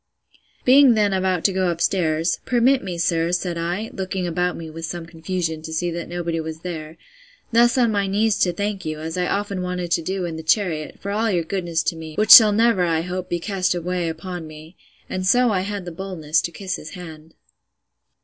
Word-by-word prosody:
Being 260 -1 +7
then 205 -2 +2
about 185 -2 0
to 195 - +3
go 185 0 +1
up 170 -1 -2
stairs, 165 -2 +1
Permit 255 +2 +2
me, 180 -3 -5
sir, 170 0 +1
said 175 -1 -1
I, 175 +6 -3
(looking 190 -1 -3
about 180 +1 -1
me 165 - -7
with 165 +1 -9
some 175 -1 -6
confusion, 165 0 -4
to 160 - -8
see 175 +2 -1
that 170 0 -5
nobody 170 -1 -3
was 160 0 -6
there,) 160 -3 -7 0.5
thus 235 +1 +4
on 240 -3 +3
my 200 -2 0
knees 210 +2 +1
to 180 - +3
thank 200 +2 -3
you, 155 -1 -4
as 160 +1 -5
I 180 -1 0
often 200 -2 -2
wanted 180 -1 -4
to 170 - +2
do 185 +2 -3
in 165 -2 -5
the - - -5
chariot, 160 -2 0
for 200 - -5
all 220 +2 0
your 175 -4 +1
goodness 170 -2 -2
to - - -1
me, 160 -1 -9
which 215 0 +2
shall 215 -3 +11
never, 225 -3 +3
I 165 -2 +1
hope, 180 +1 -5
be 175 - -1
cast 185 -1 -1
away 175 0 -2
upon 170 +1 -6
me. 155 +3 -12 0.3
And 185 - -4
so 245 +5 +4
I 195 - +1
had 200 -1 -4
the 175 - -6
boldness 165 -4 -1
to 170 - -4
kiss 190 +2 -4
his 155 - -10
hand. 160 -3 -11
180 Hz, 215 wpm, -22 LUFS, 165-195 Hz, 0.5 s, shall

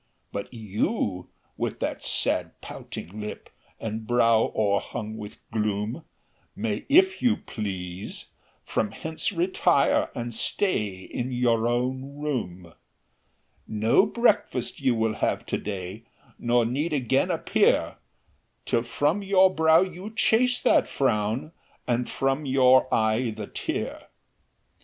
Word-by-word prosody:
"But 100 - -5
you, 105 - -2 0.3
with - - -3
that - - -2
sad - - 0
pouting 100 +6 -8
lip, 105 - -7 0.3
And 110 0 -5
brow 115 -2 +3
o'erhung 105 +1 -1
with 105 -1 -8
gloom, 105 +6 -2 0.5
May, 105 -1 -3
if 375 +6 +5
you 245 -3 +3
please, 95 -3 -6 0.3
from 105 - -1
hence 160 +2 -3
retire, 175 -4 +2
And 120 0 -4
stay 105 - 0
in 125 +6 -4
your 120 -2 +2
own 130 +3 -2
room. 95 - -4 0.9
"No 110 - +3
breakfast 215 - +1
you 130 -3 +2
will 110 -1 +1
have - - 0
to - - -2
day, 100 +2 -6 0.3
Nor 120 0 +2
need 145 +8 -1
again 130 -6 +1
appear, - - +2 0.7
Till 115 - +1
from 145 - 0
your 190 -1 +4
brow 160 0 +5
you 185 +2 -4
chase 250 +3 +3
that - - +4
frown, 115 +2 0 0.4
And 120 0 0
from 135 +2 -1
your 130 -1 +5
eye 110 +1 +1
the 105 - -4
tear. - - -4
120 Hz, 120 wpm, -26 LUFS, 110-150 Hz, 0.9 s, if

